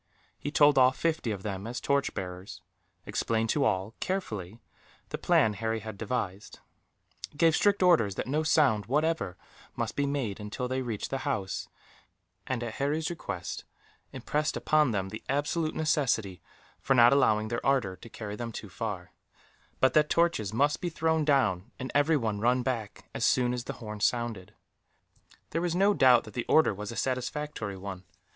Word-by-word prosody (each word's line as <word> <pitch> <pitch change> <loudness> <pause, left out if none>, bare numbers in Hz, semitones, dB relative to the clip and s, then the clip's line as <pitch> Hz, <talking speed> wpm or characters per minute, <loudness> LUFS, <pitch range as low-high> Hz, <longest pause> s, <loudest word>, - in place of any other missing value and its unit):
He - - -3
told 145 -1 +5
off 130 0 +5
fifty 160 -7 0
of 100 -3 -4
them 100 0 -4
as 120 0 -4
torch 140 +2 0
bearers; 90 +1 -7 0.4
explained 115 -1 0
to 145 - +1
all, 100 -2 0
carefully, 110 - -4 0.5
the - - -4
plan 110 -1 +3
Harry 110 +2 -2
had 110 0 -7
devised; 100 -3 -4 0.8
gave 165 0 +4
strict 200 -2 +3
orders 135 - +4
that - - -3
no 150 +4 0
sound, 140 - +3
whatever, 150 - 0 0.4
must - - -3
be 140 0 0
made 130 -8 -2
until 105 +4 -4
they 130 +1 -1
reached 115 -5 -4
the 135 - -1
houses 130 -9 -3 0.8
and, 125 -2 -2
at 115 -2 -4
Harry's 150 +5 -1
request, 170 - -5 0.5
impressed 150 0 -1
upon 155 -2 +3
them 95 -4 -2
the 110 - -8
absolute 155 +3 0
necessity 130 - 0 0.4
for 135 - +1
not 120 +1 +7
allowing 110 -6 +3
their 120 - -3
ardour 130 -9 +1
to 115 - -12
carry 105 -2 -6
them 115 +1 -5
too 105 -2 -8
far; 100 -3 -5 0.7
but 130 -1 +4
that 150 +1 +4
torches 165 - +1
must 145 +6 +1
be 175 - -1
thrown 160 0 +1
down, 120 - +2
and 130 0 -5
everyone 145 -8 +2
run 125 +3 +2
back, 115 -5 -4
as - - -3
soon 125 -1 +3
as 125 -1 -4
the - - -4
horn 105 -2 -8
sounded. 110 -2 -1 1.0
There 165 - -1
was 175 -1 -1
no 200 +3 +4
doubt 125 -8 +5
that 110 - -12
the 120 - -3
order 160 -8 +4
was 105 +2 -6
a - - -7
satisfactory 130 -4 -3
one. 95 -1 -7
125 Hz, 170 wpm, -29 LUFS, 105-145 Hz, 1.0 s, not